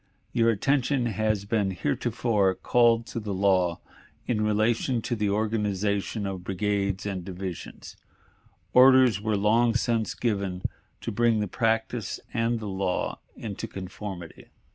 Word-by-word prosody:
"... - - -40
Your 115 -1 +3
attention 130 +3 +1
has 110 -2 0
been 100 -2 +1
heretofore 100 - 0
called 115 -1 +3
to 115 - -5
the 105 -3 -4
law 95 -3 +2 0.4
in 110 -3 0
relation 110 +4 +1
to 120 - -1
the 105 -2 0
organization 105 -1 -1
of 95 -2 -4
brigades 100 +1 -1
and 95 -3 -3
divisions 95 -1 -7 0.8
orders 130 -5 +6
were 110 -1 0
long 115 +3 +3
since 115 -2 0
given 100 -6 -2 0.4
to - - -3
bring 115 +1 +2
the 105 - -1
practice 115 +1 -1
and 115 0 0
the 110 - -6
law 95 -2 -2 0.2
into 105 -4 -5
conformity. 95 -2 -8
105 Hz, 135 wpm, -27 LUFS, 95-115 Hz, 0.8 s, orders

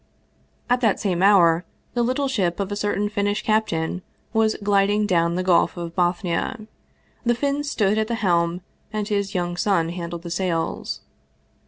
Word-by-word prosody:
At 245 0 +2
that 220 -5 +2
same 185 -4 -1
hour 180 -4 +5 0.3
the 240 - +1
little 255 +4 0
ship 190 -10 0
of 200 0 -2
a - - -1
certain 205 0 0
Finnish 205 0 -1
cap 215 0 +2
tain 165 +2 -2 0.3
was 220 -1 +2
gliding 205 +1 +3
down 170 -3 +2
the 185 - -1
Gulf 180 -1 +3
of 170 -1 -6
Bothnia. 180 +5 -1 0.6
The 240 0 +2
Finn 285 +3 -1
stood 215 -7 +1
at 220 - 0
the 235 - -1
helm 175 -4 +1 0.3
and 215 -1 -2
his 200 -1 -1
young 175 -1 -1
son 175 -4 +1
handled 170 -1 -5
the 170 - -6
sails. 170 -2 -2
195 Hz, 170 wpm, -23 LUFS, 175-215 Hz, 0.6 s, hour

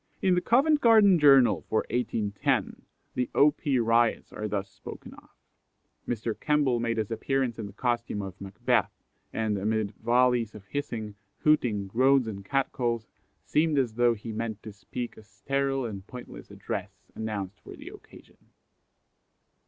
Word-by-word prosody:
In 185 - +3
the 180 - +2
Covent 290 - +3
Garden 215 -6 +6
Journal 135 -4 +6
for 110 - +1
1810 105 -4 -1 0.3
the 125 -1 -1
O. 150 +1 +6
P. 145 -2 -1
Riots 115 0 +2
are 105 - -4
thus 100 -1 -2
spoken - - -11
of: - - -17 0.8
"Mr. 115 -1 -2
Kemble 145 -5 +2
made 115 0 -1
his 110 0 -2
appearance 125 +1 -1
in 105 - -4
the - - -10
costume 120 -2 -2
of 95 0 -9
'Macbeth,' 95 0 -1 0.3
and, 110 -2 -1
amid 110 0 -1
vollies 120 -2 +2
of 100 -2 -11
hissing, 110 -5 -4 0.3
hooting, 120 -10 +2
groans, 130 +6 +3
and 100 -3 -6
cat 135 +6 0
calls, 115 -3 -1 0.4
seemed 155 0 +1
as 125 -5 +1
though 120 0 +3
he 110 +2 -7
meant 110 -1 -4
to 110 - -7
speak 115 +4 -6
a - - -11
steril 135 +4 -2
and 100 -3 -8
pointless 125 -1 -10
address - - -7
announced 105 -3 -5
for - - -11
the - - -10
occasion." - - -16
115 Hz, 155 wpm, -28 LUFS, 105-135 Hz, 0.8 s, Garden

